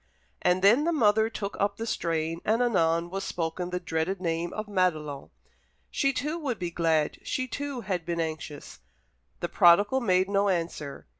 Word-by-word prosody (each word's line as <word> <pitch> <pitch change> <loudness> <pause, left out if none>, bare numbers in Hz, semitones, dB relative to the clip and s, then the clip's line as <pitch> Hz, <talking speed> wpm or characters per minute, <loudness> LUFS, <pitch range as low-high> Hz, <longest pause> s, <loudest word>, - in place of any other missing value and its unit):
And 180 +1 +2
then 235 +10 +5
the 340 - +2
mother 220 -7 +3
took 205 -3 -5
up 200 0 0
the 225 - -4
strain, 165 -4 -2
and 220 +2 +2
anon 170 -6 +1
was 195 +1 -3
spoken 175 +1 -3
the 180 0 -2
dreaded 175 +2 -2
name 170 -1 -2
of 215 - -4
Madelon. 155 -8 -1 0.6
She 275 - +2
too 300 +5 -3
would 270 -8 -2
be 175 -2 -4
glad 160 -3 +1
she 255 - -2
too 280 0 -4
had 185 -5 -2
been 170 0 -3
anxious. 155 -2 -5 0.6
The - - -1
prodigal 205 +9 +5
made 185 -4 +2
no 200 0 +2
answer. 165 -5 -3
185 Hz, 170 wpm, -27 LUFS, 165-220 Hz, 0.6 s, then